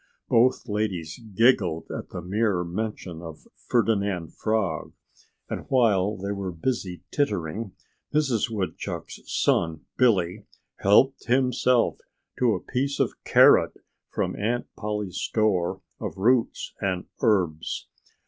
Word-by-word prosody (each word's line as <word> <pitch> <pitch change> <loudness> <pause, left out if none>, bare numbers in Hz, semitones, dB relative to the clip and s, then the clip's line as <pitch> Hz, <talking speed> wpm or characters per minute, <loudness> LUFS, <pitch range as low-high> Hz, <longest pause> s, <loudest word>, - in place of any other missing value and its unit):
Both 125 +2 +3
ladies 100 -7 -2 0.2
giggled 95 -8 +3
at - - -6
the 90 - -6
mere 100 -1 +1
mention 90 -2 -4
of 80 -2 -10 0.2
Ferdinand 100 -8 +1
Frog. 105 -8 -1 0.5
And - - -5
while 105 -5 +3
they 100 +2 -4
were 100 -2 -3
busy 90 0 -3
tittering, 100 - -1 0.4
Mrs. 135 -7 +1
Woodchuck's 95 -7 -4
son 80 -2 +1
Billy 100 -5 +2 0.3
helped 130 +7 +4
himself 125 -1 +2 0.4
to 120 -4 +3
a - - -3
piece 140 +2 -2
of - - +1
carrot - - +6 0.4
from - - -2
Aunt 120 +4 -1
Polly's 105 -3 -3
store 100 -6 0 0.2
of - - -5
roots 115 +4 +1
and 95 -2 -1 0.2
herbs. 90 -7 +1
105 Hz, 115 wpm, -26 LUFS, 90-115 Hz, 0.5 s, carrot